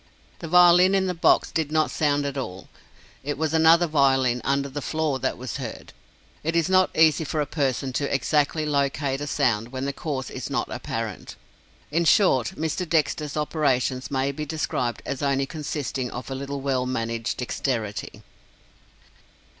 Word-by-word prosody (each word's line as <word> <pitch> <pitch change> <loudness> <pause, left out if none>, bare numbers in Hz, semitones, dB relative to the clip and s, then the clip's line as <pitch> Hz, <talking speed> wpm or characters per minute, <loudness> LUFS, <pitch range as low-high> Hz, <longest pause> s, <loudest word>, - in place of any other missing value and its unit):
The 165 - -6
violin 180 +2 +6
in 190 -1 +2
the 180 - -1
box 165 - +3
did 155 -2 -1
not 155 -1 +2
sound 145 -2 +1
at 140 -1 -3
all. 95 -9 -6 0.5
It 145 +1 -3
was 160 +1 -1
another 165 +2 +5
violin, 135 -5 +2
under 140 +1 0
the 140 +2 -5
floor, 155 -2 -1
that 130 - -1
was 130 +2 -5
heard. 125 -5 -7 0.5
It 165 +2 -1
is 170 -1 +2
not 185 0 +5
easy 160 -1 +5
for 155 +1 -3
a 150 - +1
person 135 -4 -1
to 140 +2 -1
exactly 150 +3 +1
locate 140 -1 0
a 145 - -3
sound 115 -4 0
when 130 0 -4
the 140 - -2
cause 140 -5 -4
is - - -6
not - - -2
apparent. - - -5 0.6
In 170 +2 +1
short, 135 - +3
Mr. 160 +2 -2
Dexter's 155 -2 0
operations 135 -4 0
may 135 0 0
be 150 +2 -5
described 145 -6 -2
as 135 - -4
only 140 -1 +1
consisting 140 -4 -4
of 125 +2 -7
a - - -1
little 140 +1 -5
well 130 -2 0
managed 115 -2 -2
Dexterity! 120 -4 -3
140 Hz, 170 wpm, -24 LUFS, 130-155 Hz, 0.6 s, violin